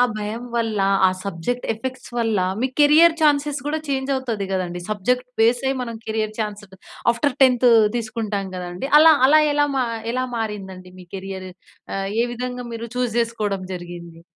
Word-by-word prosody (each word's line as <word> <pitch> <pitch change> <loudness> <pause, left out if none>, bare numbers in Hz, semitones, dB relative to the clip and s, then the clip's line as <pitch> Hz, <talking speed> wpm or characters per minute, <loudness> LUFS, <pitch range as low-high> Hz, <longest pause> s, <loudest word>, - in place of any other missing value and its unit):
ఆ - - +7 0.2
భయం 215 +3 -4
వల్ల, 225 -2 -1 0.3
ఆ - - +1
సబ్జెక్ట్ 200 +7 -3
ఎఫెక్ట్స్ 255 +3 -7
వల్ల, 225 -3 +1 0.2
మీ 260 - +1
కెరీర్ 315 +3 +6
ఛాన్సెస్ 290 -1 +2
కూడా 310 +1 -1
ఛేంజ్ 270 0 -1
అవుతది 230 -7 -3
కదండీ. 175 -2 -3
సబ్జెక్ట్ 250 +5 0
బేసే 245 +4 +2
మనం 230 -2 -5
కెరీర్ 215 -1 -2
ఛాన్స్ 210 -1 -4
త్ - - -13 0.4
ఆఫ్టర్ 275 +3 -1
టెన్తు 250 -2 +5 0.3
తీసుకుంటాం 215 -4 -3
కదండీ! 180 +7 -5
అలా, 320 0 +8 0.2
అలా 310 +2 +6
ఎలా 290 0 +2
మా 255 - +2 0.3
ఎలా 255 +1 -1
మారిందండి 190 -4 -6
మీ 180 - -13
కెరియర్? 190 -1 -7 0.5
ఆహ్, 195 0 -2
ఏ - - +2
విధంగా 250 0 -5
మీరు 230 +1 -6
ఛూస్ 245 -2 -1
జేసుకోడం 215 -5 -1
జరిగింది? 170 -1 -9
230 Hz, 165 wpm, -22 LUFS, 195-255 Hz, 0.5 s, అలా